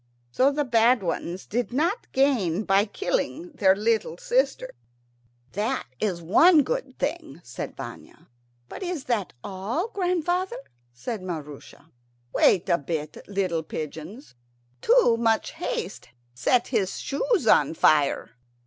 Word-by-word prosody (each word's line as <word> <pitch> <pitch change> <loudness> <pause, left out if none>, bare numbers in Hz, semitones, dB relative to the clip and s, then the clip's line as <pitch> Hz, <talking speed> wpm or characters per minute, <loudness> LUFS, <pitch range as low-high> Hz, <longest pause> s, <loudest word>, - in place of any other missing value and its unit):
So 260 - +3
the 295 +1 0
bad 235 -2 +3
ones 175 +1 -3
did 240 +3 -2
not 335 - -1
gain 225 - +2
by 195 0 +3
killing 355 - -2
their 195 -9 +3
little 215 -5 0
sister. 260 +4 0 0.8
"That 220 +7 -1
is 180 -5 -2
one 305 - +6
good - - -4
thing," 170 - -3
said 125 - -7
Vanya. - - -10 0.4
"But - - -9
is 355 -6 -3
that 225 -6 -1
all, 210 - -3
grandfather?" 360 -2 -1 0.3
said 195 - -5
Maroosia. 155 -2 -8 0.4
"Wait 185 - +4
a 170 -2 +2
bit, 150 0 -4
little 185 -5 -1
pigeons. 160 - -7 0.5
Too 470 - +4
much 225 -1 +1
haste 440 - -5 0.2
set 235 - +1
his 205 -7 0
shoes 425 - 0
on 160 -7 +4
fire. 150 -3 +3
225 Hz, 125 wpm, -25 LUFS, -, 0.8 s, one